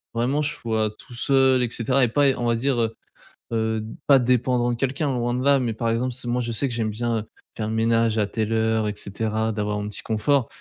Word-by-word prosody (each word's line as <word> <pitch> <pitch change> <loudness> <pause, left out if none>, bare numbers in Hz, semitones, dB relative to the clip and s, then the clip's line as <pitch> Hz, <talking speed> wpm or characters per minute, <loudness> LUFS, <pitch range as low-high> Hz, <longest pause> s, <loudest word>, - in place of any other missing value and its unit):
vraiment 130 +6 +1
je 150 0 0
sois 110 -4 -1
tout - - -12
seul 130 +1 +3
et 120 - -1
cetera. 130 +3 +1
Et - - +4
pas 140 +5 +3
on 120 - -1
va 115 - +2
dire, 130 +1 0
heu 115 0 -1 0.6
heu, 110 -1 0 0.2
pas 140 - +7
dépendant 125 0 +2
de - - -1
quelqu'un 135 +3 -1
loin 120 -1 -1
de 125 - -2
là, 140 0 +4
mais 120 -3 -1
par 115 +1 -2
exemple, 125 +2 -1
si 125 0 -4
moi 120 +1 0
je 120 -1 -3
sais 125 +5 0
que 125 - -4
j'aime 115 -2 -1
bien, 115 +2 -1
heu, - - -5 0.3
faire 110 -1 -3
ménage 115 0 +2
à 105 - +2
telle 110 +1 -2
heure 110 -1 +1
et 105 - -2
cetera, 110 +2 -2
d'avoir 105 -1 -2
mon 105 0 -4
petit 105 - -4
confort. 120 +3 +1
115 Hz, 245 wpm, -23 LUFS, 110-125 Hz, 0.6 s, pas